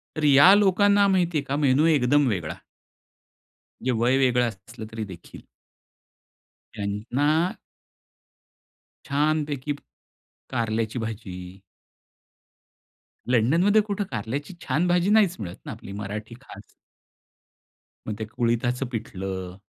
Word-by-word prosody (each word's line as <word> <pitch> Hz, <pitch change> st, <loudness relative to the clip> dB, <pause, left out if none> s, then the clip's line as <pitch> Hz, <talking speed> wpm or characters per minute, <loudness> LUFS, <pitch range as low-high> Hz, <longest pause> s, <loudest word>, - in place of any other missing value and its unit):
तर 155 Hz, -, -3 dB
या 145 Hz, +7 st, +8 dB
लोकांना 205 Hz, 0 st, +4 dB
माहिती 175 Hz, -4 st, +1 dB
आहे 140 Hz, -, -1 dB
का 140 Hz, -, -1 dB
मेनू 135 Hz, +4 st, +4 dB
एकदम 145 Hz, -2 st, +3 dB
वेगळा. 90 Hz, -8 st, -2 dB, 1.2 s
म्हणजे 130 Hz, +2 st, 0 dB
वय 130 Hz, +2 st, +3 dB
वेगळं 125 Hz, -2 st, +3 dB
असलं 110 Hz, +3 st, -11 dB
तरी 110 Hz, -1 st, -4 dB
देखील. 90 Hz, -3 st, -12 dB, 1.3 s
त्यांना 110 Hz, +8 st, -1 dB, 1.7 s
छानपैकी 145 Hz, -1 st, 0 dB, 0.8 s
कारल्याची 115 Hz, +1 st, -1 dB
भाजी. 95 Hz, -4 st, -7 dB, 1.7 s
लंडनमध्ये 165 Hz, -, +4 dB
कुठं 205 Hz, -1 st, -3 dB
कारल्याची 135 Hz, -, -4 dB
छान 155 Hz, +7 st, +1 dB
भाजी 175 Hz, +2 st, +2 dB
नाहीच 210 Hz, -4 st, +4 dB
मिळत 90 Hz, -3 st, -6 dB
ना, -, -, -5 dB
आपली 100 Hz, -, -9 dB
मराठी 105 Hz, +3 st, -6 dB
खास. 105 Hz, -6 st, -13 dB, 1.4 s
मग 105 Hz, -, -3 dB
ते 110 Hz, -, -3 dB
कुळीथाचं 120 Hz, +3 st, -1 dB
पीठलं. 95 Hz, -4 st, -5 dB
125 Hz, 105 wpm, -25 LUFS, 110-155 Hz, 1.7 s, या